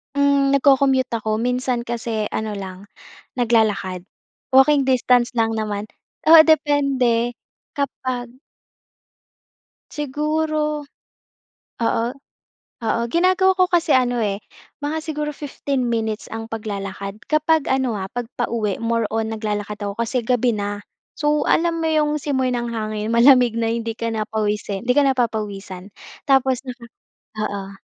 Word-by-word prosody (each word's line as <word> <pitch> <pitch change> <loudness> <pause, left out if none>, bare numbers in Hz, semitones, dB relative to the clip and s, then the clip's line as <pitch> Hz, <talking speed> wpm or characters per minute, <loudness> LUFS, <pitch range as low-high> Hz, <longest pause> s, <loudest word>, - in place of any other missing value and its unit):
Hmm, 280 -1 +3
nagko-commute 270 -2 +3
ako, 215 0 -2
minsan 250 0 0
kasi 230 -2 -3
ano 215 -1 -3
lang 190 -1 -7 0.5
naglalakad. 215 -6 +1 0.5
Walking 275 +1 +5
distance 250 -1 +2
lang 225 -1 0
naman 210 -1 -3 0.4
oo, 325 - +10
depende 270 -6 +2 0.4
kapag 255 -3 -3 1.6
Siguro 300 +1 -1 1.0
oo. 230 0 +1 0.8
Oo, 230 +1 0
ginagawa 370 +3 +3
ko 370 - +5
kasi 345 -2 +1
ano, 245 -2 +2
eh, 200 -2 0 0.5
mga 315 +2 -2
siguro 300 -1 -3
15 275 -3 -3
minutes 220 -2 -2
ang 225 0 -5
paglalakad 200 -2 -5
kapag 310 0 +2
ano, 260 -4 +1
ha, 190 - -4
kapag 245 -1 -4
pauwi, 225 -5 -1
more 230 -1 0
on 225 0 -1
naglalakad 210 -1 -4
ako 200 0 -4
kasi 235 +2 -1
gabi 245 0 +2
na. 205 0 -3 0.4
So, 295 -1 +1
alam 330 0 +2
mo 320 - 0
'yong 300 -1 +1
simoy 260 -3 0
ng 240 -1 -2
hangin 215 -1 -3
malamig 245 -1 +6
na 225 -1 0
hindi 230 -1 -3
ka 230 0 -2
na 215 -1 -2
pawisin, 210 -1 -2
hindi 250 - +3
ka 290 - +6
na 265 - +1
papawisan 205 -5 -3 0.4
tapos 265 -2 +3
na 250 - -5 0.7
oo. 195 -1 -6
240 Hz, 130 wpm, -21 LUFS, 215-280 Hz, 1.6 s, oo